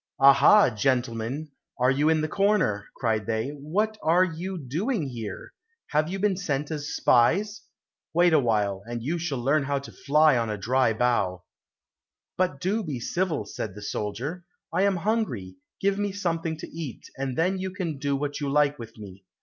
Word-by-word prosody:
"Aha, 140 +5 +7
gentlemen, 125 +4 -1 0.3
are 125 +1 +3
you 145 +3 +2
in 160 -1 +3
the 155 - 0
corner?" 185 - +1
cried 110 -3 -1
they, 110 +3 -1
"What 185 +10 -2
are 170 +3 +4
you 185 +2 -4
doing 165 - -2
here? 115 -6 -7 0.4
Have 155 +2 +2
you 190 - -3
been 195 -1 +1
sent 150 -5 -2
as 145 -2 -4
spies? 190 - +3 0.5
Wait 175 0 +4
a 155 - +6
while, 105 -6 0
and 120 -1 -5
you 165 +6 -1
shall 160 -5 -2
learn 140 +5 +2
how 140 0 -1
to 140 - -7
fly 150 -2 +3
on 115 -1 -1
a 105 - -2
dry 125 +4 +2
bough." 110 -6 0 0.9
"But 180 -6 0
do 200 +8 0
be 145 -8 -4
civil," 160 - -1
said 100 -1 -6
the 105 - -9
soldier, 125 - -4 0.3
"I 190 - +3
am 200 -1 +2
hungry, 170 - -2 0.2
give 195 0 +1
me 205 -1 -1
something 165 -4 -2
to - - -7
eat, 155 -7 -7
and 135 -2 -3
then 185 +3 +1
you 190 0 -2
can 180 -6 -4
do 140 0 0
what 145 +1 -3
you 140 - -1
like 145 0 +2
with 115 -1 -10
me." 100 -2 -11
145 Hz, 180 wpm, -26 LUFS, 120-180 Hz, 0.9 s, Aha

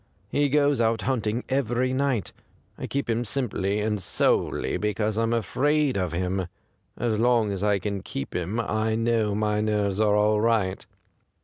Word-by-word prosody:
He 145 +5 +1
goes 145 -2 +3
out 115 0 +1
hunting 120 -2 -1
every 130 -1 0
night. 130 - 0 0.4
I - - -6
keep 140 0 -2
him 115 +1 0
simply 105 -5 -1
and 105 -1 -1
solely - - 0
because 105 0 -1
I'm 115 +1 0
afraid 135 +6 +1
of 90 -4 -1
him. 90 +2 -1 0.5
As 115 -3 0
long 115 -3 +3
as 100 0 -3
I 105 -1 +3
can 100 0 -3
keep 70 - -6
him 90 +6 -2
I 110 0 0
know 115 -2 +1
my 105 0 0
nerves 105 -2 0
are 105 -1 +3
all 105 0 +3
right. 105 -5 +1
110 Hz, 165 wpm, -25 LUFS, 105-120 Hz, 0.5 s, goes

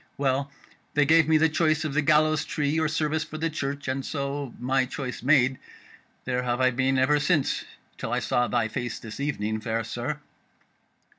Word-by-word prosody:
Well, 140 0 0 0.5
they 150 -1 +4
gave 160 +1 +5
me 160 0 +5
the 160 +1 +4
choice 155 -1 +1
of 150 - -2
the 155 - +2
gallows 155 +1 +3
tree 150 0 -1
or 160 - +2
service 155 0 0
for 155 - -8
the 165 +1 -1
Church, 140 -2 -4
and 130 +1 -1
so, 140 -2 -3
my 130 +1 +1
choice 130 -1 -5
made, 130 -1 +3 0.7
there 125 -1 0
have 120 0 -1
I 130 0 +4
been 130 +2 +1
ever 140 +3 +3
since, 145 -2 +1 0.3
till - - -4
I - - +1
saw 120 0 +1
thy 120 -2 +1
face 120 +2 -4
this 115 +2 -9
evening, 110 -7 -2
fair 115 0 -1
sir." 120 +6 -4
140 Hz, 190 wpm, -26 LUFS, 125-155 Hz, 0.7 s, gave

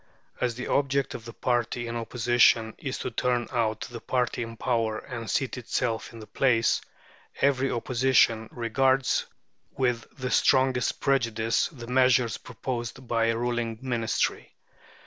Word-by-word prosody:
As 120 -2 0
the 125 - -5
object 140 -1 +1
of 115 - -8
the 115 - -8
party 120 -1 -1
in 120 0 -4
opposition 115 -1 +3
is 135 -2 -4
to - - -4
turn 120 +1 0
out 110 -3 0
the 120 -2 -7
party 125 0 -1
in 115 -1 -6
power 115 -3 0
and 115 -2 -7
seat 135 -2 -1
itself 115 -1 -2
in 115 - -11
their 110 - -9
place, 115 -1 +2 0.6
every 135 -1 +2
Opposition 120 -2 +2
regards 130 +3 +1 0.5
with 125 -3 0
the 130 -1 -3
strongest 130 -2 +2
prejudice 115 -5 +1
the 125 -7 -10
measures 125 -1 +3
proposed 125 0 -6
by 115 -1 +1
a 115 0 +1
ruling 120 -1 -2
Ministry. 120 -3 -1
120 Hz, 145 wpm, -27 LUFS, 115-130 Hz, 0.6 s, opposition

